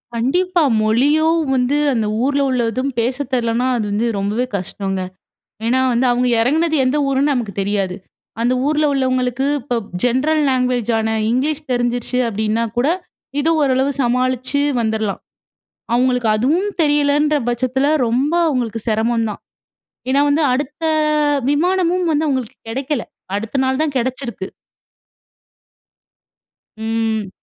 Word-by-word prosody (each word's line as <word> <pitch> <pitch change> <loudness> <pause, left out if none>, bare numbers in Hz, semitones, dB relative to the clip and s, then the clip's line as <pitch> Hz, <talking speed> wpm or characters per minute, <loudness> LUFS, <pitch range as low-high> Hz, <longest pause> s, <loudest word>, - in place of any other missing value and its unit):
கண்டிப்பா! 350 +9 +1 0.2
மொழியும் 295 +9 +3
வந்து, 260 +2 +1 0.2
அந்த 225 -3 0 0.2
ஊர்ல 280 +1 +1
உள்ளதும் 255 +2 -1
பேச 245 +3 0 0.2
தெர்லன்னா, 235 0 +1
அது 215 - -1
வந்து 210 +3 0
ரொம்பவே 205 +5 -1
கஷ்டங்க. 195 0 -3 0.7
ஏன்னா, 255 +3 +2
வந்து 240 +2 +2
அவுங்க 245 +1 +1
எறங்குனது 315 +7 +2
எந்த 255 +3 +1
ஊருன்னு 275 +2 +2
நமக்கு 235 -6 -2
தெரியாது. 195 -2 -1 0.4
அந்த 240 +2 +2
ஊர்ல 305 0 +2
உள்ளவங்களுக்கு 255 -1 0 0.2
இப்போ 245 -1 -3 0.3
ஜென்ரல் 285 +6 +2
லாங்குவேஜான 245 -3 0 0.2
இங்லீஷ் 290 +5 0
தெரிஞ்சிருச்சு 245 0 -1
அப்படீன்னா 220 +1 -1
கூட 245 +4 +2 0.5
இது 315 +3 +2
ஓரளவு 265 0 +2
சமாளிச்சு 255 +2 +1 0.2
வந்துரலாம். 220 -2 -1 0.7
அவுங்களுக்கு 250 -1 +2
அதுவும் 315 - +1
தெரியலன்ற 295 0 +2
பச்சத்துல, 255 +3 0 0.2
ரொம்ப 260 +7 0
அவுங்களுக்கு 240 -6 -2
சிரமம் 225 +1 +1
தான். 205 - -7 0.7
ஏன்னா, 275 +2 +3
வந்து 300 +2 +2
அடுத்த 290 +4 -4 0.7
விமானமும் 360 +3 +1
வந்து 305 +1 +1
அவுங்களுக்கு 260 -3 -2
கெடைக்கல. 265 +2 -2 0.3
அடுத்த 225 +6 -3
நாள் 265 0 0
தான் 300 -3 -2
கெடச்சிருக்கு. 245 -5 -3 2.3
ம். 220 -2 -1
255 Hz, 120 wpm, -18 LUFS, 230-285 Hz, 2.3 s, மொழியும்